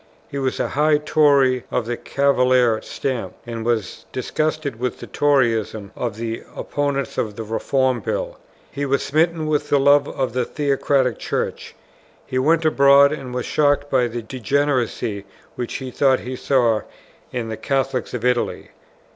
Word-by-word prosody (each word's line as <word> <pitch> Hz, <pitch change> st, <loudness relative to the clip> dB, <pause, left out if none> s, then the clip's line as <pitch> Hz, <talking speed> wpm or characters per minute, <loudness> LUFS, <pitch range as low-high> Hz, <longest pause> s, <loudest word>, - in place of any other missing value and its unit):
He 140 Hz, -, -5 dB
was 130 Hz, -1 st, -1 dB
a -, -, 0 dB
high 150 Hz, +1 st, +3 dB
Tory 140 Hz, -4 st, +3 dB
of 120 Hz, -, -1 dB
the 120 Hz, +1 st, -2 dB
Cavalier 125 Hz, -4 st, +2 dB
stamp, 130 Hz, -4 st, -4 dB
and 115 Hz, -1 st, -5 dB
was 115 Hz, -4 st, -2 dB
disgusted 155 Hz, -1 st, -2 dB
with 125 Hz, -1 st, -2 dB
the -, -, -7 dB
Toryism 115 Hz, -8 st, +1 dB
of 120 Hz, -4 st, -3 dB
the 115 Hz, 0 st, -4 dB
opponents 140 Hz, -1 st, -2 dB
of 105 Hz, -3 st, -2 dB
the 115 Hz, -, -5 dB
Reform 130 Hz, +4 st, 0 dB
Bill. -, -, -3 dB, 0.3 s
He 145 Hz, -, -4 dB
was 140 Hz, 0 st, +1 dB
smitten 160 Hz, +2 st, +1 dB
with 155 Hz, -1 st, 0 dB
the 145 Hz, -, +4 dB
love 140 Hz, +1 st, +5 dB
of 130 Hz, -3 st, -2 dB
the 125 Hz, 0 st, +1 dB
Theocratic 135 Hz, -2 st, 0 dB
Church; -, -, -3 dB, 0.5 s
he 130 Hz, -, -2 dB
went 160 Hz, +4 st, +2 dB
abroad 140 Hz, -1 st, +6 dB
and 135 Hz, -4 st, -5 dB
was 125 Hz, 0 st, -3 dB
shocked 145 Hz, -1 st, +1 dB
by 125 Hz, -2 st, +3 dB
the 120 Hz, 0 st, -5 dB
degeneracy 125 Hz, -4 st, -1 dB, 0.3 s
which 120 Hz, -, -5 dB
he 130 Hz, -2 st, -5 dB
thought 135 Hz, 0 st, +2 dB
he 130 Hz, +1 st, -5 dB
saw 120 Hz, -5 st, +2 dB, 0.5 s
in 120 Hz, -2 st, -3 dB
the 110 Hz, -, -3 dB
Catholics 135 Hz, -2 st, -1 dB
of 120 Hz, 0 st, -4 dB
Italy. 125 Hz, -1 st, 0 dB
130 Hz, 160 wpm, -21 LUFS, 120-145 Hz, 0.5 s, abroad